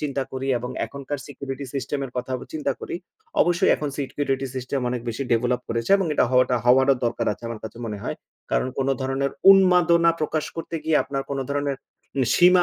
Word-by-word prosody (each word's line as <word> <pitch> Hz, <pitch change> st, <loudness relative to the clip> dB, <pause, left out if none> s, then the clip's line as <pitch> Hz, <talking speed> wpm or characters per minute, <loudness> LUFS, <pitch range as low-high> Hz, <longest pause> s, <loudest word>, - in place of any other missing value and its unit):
চিন্তা 140 Hz, -2 st, -1 dB
করি, 135 Hz, +1 st, -3 dB
এবং 125 Hz, +1 st, -5 dB, 0.2 s
এখনকার 140 Hz, 0 st, -5 dB
সিকিউরিটি 140 Hz, 0 st, -6 dB
সিস্টেম 140 Hz, +1 st, -2 dB
এর 135 Hz, -, -7 dB
কথা 125 Hz, +1 st, -3 dB, 0.2 s
চিন্তা 145 Hz, -3 st, -1 dB
করি, -, -, -4 dB, 0.4 s
অবশ্যই 175 Hz, +2 st, +3 dB
এখন 150 Hz, -, -3 dB
সিকিউরিটি 135 Hz, -1 st, -1 dB
সিস্টেম 130 Hz, +1 st, -2 dB
অনেক 125 Hz, 0 st, -2 dB
বেশি 115 Hz, +4 st, -2 dB
ডেভেলপ 125 Hz, +2 st, +2 dB
করেছে 115 Hz, +4 st, -2 dB
এবং 190 Hz, -, 0 dB
এটা -, -, +4 dB
হওয়াটা 125 Hz, -1 st, +4 dB
হওয়াটা 130 Hz, +2 st, +5 dB
দরকার 120 Hz, -, -1 dB
আছে -, -, -12 dB
আমার 115 Hz, -2 st, -6 dB
কাছে 110 Hz, +2 st, -8 dB
মনে 105 Hz, -2 st, -4 dB
হয়। -, -, -3 dB, 0.3 s
কারণ 130 Hz, -, +1 dB
কোনো 135 Hz, 0 st, +2 dB
ধরনের 135 Hz, +1 st, -1 dB, 0.2 s
উন্মাদনা 180 Hz, -3 st, +6 dB
প্রকাশ 155 Hz, 0 st, -1 dB
করতে 165 Hz, 0 st, -4 dB
গিয়ে 160 Hz, -1 st, +3 dB
আপনার 135 Hz, -1 st, -3 dB
কোনো 135 Hz, -1 st, -1 dB
ধরণের 140 Hz, -1 st, -1 dB, 0.6 s
সীমা 180 Hz, 0 st, +6 dB
135 Hz, 185 wpm, -24 LUFS, 125-150 Hz, 0.6 s, উন্মাদনা